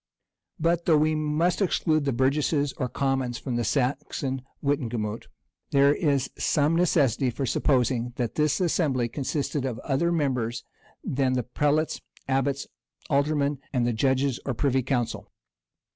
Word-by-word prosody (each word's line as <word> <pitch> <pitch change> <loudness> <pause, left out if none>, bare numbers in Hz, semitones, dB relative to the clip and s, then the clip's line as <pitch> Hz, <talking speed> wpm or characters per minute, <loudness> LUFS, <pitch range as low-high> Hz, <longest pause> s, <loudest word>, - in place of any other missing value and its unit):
But, 170 +1 +1
though 160 -3 +5
we 155 +1 +2
must 155 +5 0
exclude 155 -5 +1
the 140 - +1
burgesses 140 +3 +1
or 125 - -2
commons 135 -3 -1
from 130 -3 -4
the 120 - 0
Saxon 135 0 -1 0.2
wittenagemot, 120 -6 -2 0.4
there 140 +1 +5
is 145 -5 +1
some 150 +2 +2
necessity 145 -7 +2
for 130 +3 -3
supposing 125 -2 +1
that 120 -4 -2
this 150 -1 +1
assembly 150 -9 +1
consisted 140 +2 -2
of 125 -4 -2
other 150 +5 +1
members 125 -8 -1 0.4
than 130 -1 0
the 125 -1 0
prelates, 150 +5 0 0.3
abbots, 135 +1 0 0.5
alderman, 140 0 +1
and 125 -3 +1
the 120 - +1
judges 130 +2 +1
or 135 - -2
privy 130 +3 +1
council. 125 -2 -2
140 Hz, 140 wpm, -26 LUFS, 125-150 Hz, 0.5 s, though